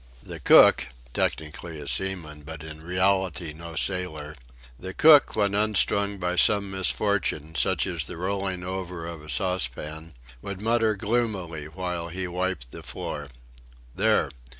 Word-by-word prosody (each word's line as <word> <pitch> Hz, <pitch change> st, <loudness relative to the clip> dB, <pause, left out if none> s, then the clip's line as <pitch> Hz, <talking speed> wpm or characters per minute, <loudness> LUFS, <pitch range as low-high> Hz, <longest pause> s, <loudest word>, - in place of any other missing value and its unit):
The -, -, -8 dB
cook -, -, +6 dB, 0.3 s
(technically 80 Hz, +1 st, -3 dB
a 70 Hz, -, -9 dB
seaman, 75 Hz, +1 st, -2 dB
but 80 Hz, +1 st, -9 dB
in 80 Hz, 0 st, -9 dB
reality 90 Hz, -2 st, +1 dB
no 85 Hz, +1 st, -9 dB
sailor) 80 Hz, -4 st, 0 dB, 0.4 s
the 95 Hz, +1 st, -7 dB
cook, 150 Hz, -2 st, +6 dB
when 100 Hz, -2 st, +1 dB
unstrung 100 Hz, -1 st, +2 dB
by 90 Hz, -1 st, -2 dB
some 100 Hz, +1 st, +3 dB
misfortune, 95 Hz, -4 st, 0 dB
such -, -, +1 dB
as 85 Hz, -5 st, -2 dB
the -, -, -7 dB
rolling 95 Hz, 0 st, -2 dB
over 90 Hz, -2 st, -5 dB
of 85 Hz, -2 st, -7 dB
a 75 Hz, -, -13 dB
saucepan, 80 Hz, -3 st, -1 dB, 0.3 s
would 100 Hz, +4 st, -6 dB
mutter 110 Hz, 0 st, +2 dB
gloomily 100 Hz, -8 st, -2 dB
while 90 Hz, 0 st, -4 dB
he 90 Hz, +2 st, -4 dB
wiped 90 Hz, -8 st, -3 dB
the -, -, -9 dB
floor: 75 Hz, -1 st, -5 dB, 0.7 s
"There! 100 Hz, -6 st, +2 dB
90 Hz, 140 wpm, -26 LUFS, 80-100 Hz, 0.7 s, cook